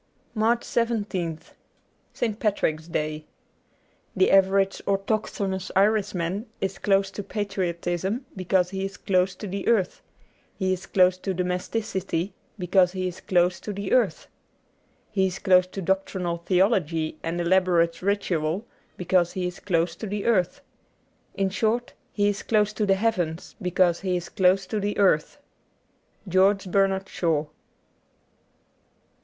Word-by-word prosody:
^ - - -43 0.3
82 230 - -7
MARCH 230 +2 +3
17th 205 -8 -1 0.7
ST. 220 -2 -2
PATRICK'S 160 -7 0
DAY 155 -2 -2 0.9
THE 380 - +3
average 195 0 +3
autochthonous 195 -1 -1
Irishman 195 0 +1
is 195 0 -3
close 195 -1 +2
to 205 - -5
patriotism 190 +2 -2
because 185 -1 +1
he 190 0 -3
is 195 0 -5
close 190 0 +1
to 210 - -8
the 195 0 -4
earth; 205 -6 +1 0.6
he 185 -2 +1
is 185 +1 -6
close 185 -1 +3
to 190 0 -3
domesticity 185 0 -2 0.2
because 180 -1 +3
he 185 -1 -2
is 180 - -7
close 180 0 +2
to 210 - -6
the 200 -1 -5
earth; 255 - +2 0.9
he 190 -2 +2
is 180 - -4
close 185 -2 +4
to 190 +1 -6
doctrinal 185 -1 -1
theology 175 -5 +1
and 165 +1 -3
elaborate 175 -1 +2
ritual 185 -1 0 0.3
because 180 -1 +1
he 185 -1 -2
is 180 +1 -5
close 170 -3 0
to 220 - -5
the 205 0 -3
earth. 200 +2 +1 0.7
In 195 -1 0
short, 225 +4 0 0.2
he 205 -1 +1
is 205 -1 -1
close 210 -1 +1
to 210 -1 -1
the 195 - +4
heavens 185 -6 -1
because 180 -1 +2
he 185 -2 -1
is 175 - -6
close 190 0 +3
to 215 +3 -2
the 205 +1 -2
earth. 190 - +2 0.5
' - - -33
George 190 +1 +3
Bernard 195 0 +2
Shaw.'' 160 -5 0
190 Hz, 140 wpm, -25 LUFS, 180-205 Hz, 0.9 s, close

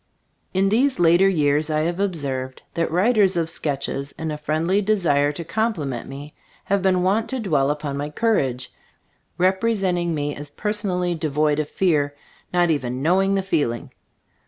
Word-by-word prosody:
In 195 +1 +2
these 255 +6 +2
later 175 +3 +5
years 150 -3 +1
I 155 0 +1
have 170 +3 -1
observed 140 -9 -3
that 165 - 0
writers 195 +1 +3
of 165 -1 0
sketches, 140 -2 -3
in 160 -1 -4
a 150 - -4
friendly 160 +6 +1
desire 170 -9 +2
to 170 - -6
compliment 165 - -2
me, 145 +2 -9 0.3
have 200 0 0
been 185 -1 +2
wont 205 +5 +1
to 265 - -2
dwell 150 - +1
upon 145 -1 -3
my 145 +1 -3
courage, 135 - 0 0.6
rep 185 +1 +2
resenting 185 -7 +1
me 145 -1 -2
as 145 0 -8
personally 185 -1 -1
devoid 150 -2 0
of 150 - -2
fear, 150 -6 +1 0.4
not 175 -1 +3
even 130 -3 -2
knowing 190 +4 +3
the 195 - 0
feeling. 145 - -1
165 Hz, 160 wpm, -22 LUFS, 145-195 Hz, 0.6 s, later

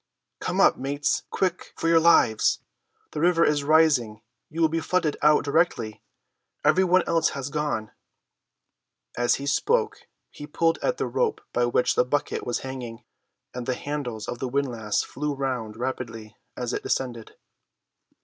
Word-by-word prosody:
"Come - - -2
up, - - +5
mates; 140 +2 -1
quick, 185 -1 -2
for - - -2
your 165 0 +5
lives! 160 -9 +4 0.5
The - - -4
river 170 0 +4
is 150 -1 +1
rising; 140 -8 +3 0.3
you 160 - -7
will 165 - +5
be 165 +1 -1
flooded 165 -3 0
out 150 0 +5
directly. 140 -8 0 0.6
Every 165 +5 +5
one 185 0 +4
else 165 -1 +2
has 140 +1 -5
gone!" 145 -8 -2 1.2
As 120 0 +2
he 140 - -6
spoke 445 - 0 0.2
he 145 - -9
pulled 165 +2 +1
at - - -1
the - - -1
rope 465 -3 0
by 120 0 +2
which 120 - +2
the - - +3
bucket 145 +1 -2
was 120 - -1
hanging, 125 -4 -7 0.5
and 125 -1 -6
the 130 - 0
handles 125 -8 -5
of 120 - -5
the 130 - -2
windlass 120 -6 -1
flew 150 +1 -4
round 125 -6 -3
rapidly 115 -4 -5 0.2
as 125 -1 -3
it - - -2
descended. 120 -4 -3
140 Hz, 160 wpm, -25 LUFS, 120-160 Hz, 1.2 s, up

